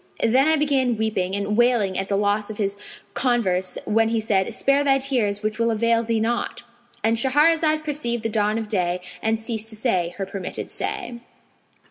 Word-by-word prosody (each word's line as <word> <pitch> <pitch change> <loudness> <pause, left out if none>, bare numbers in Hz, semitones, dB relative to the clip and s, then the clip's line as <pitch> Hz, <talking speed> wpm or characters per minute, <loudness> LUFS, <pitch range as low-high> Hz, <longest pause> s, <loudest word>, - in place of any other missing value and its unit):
Then 260 +5 +4
I 315 - +4
began 270 -6 +1
weeping 200 -4 -1
and 200 +1 -1
wailing 235 -5 +2
at 195 - -2
the 200 - +1
loss 205 +1 0
of 215 - -7
his 200 -2 -1 0.4
converse, 190 -8 0
when 225 +1 +2
he 225 0 0
said, 200 -3 0
'Spare 275 +1 +2
thy 270 -1 +4
tears 235 -7 -1
which 215 +1 -2
will 230 0 +2
avail 230 +1 +2
thee 230 -1 -1
naught!'" 235 +2 -2 0.4
And 225 +1 +2
Shahrazad 310 +5 +3
perceived 260 -7 -1
the - - +1
dawn 215 0 +1
of 225 -1 -3
day 180 -4 0 0.2
and 220 0 0
ceased 225 -1 -3
to 220 - -6
say 185 -7 -1
her 195 - -2
permitted 190 -1 -6
say. 355 -13 -4
225 Hz, 185 wpm, -23 LUFS, 205-250 Hz, 0.4 s, Then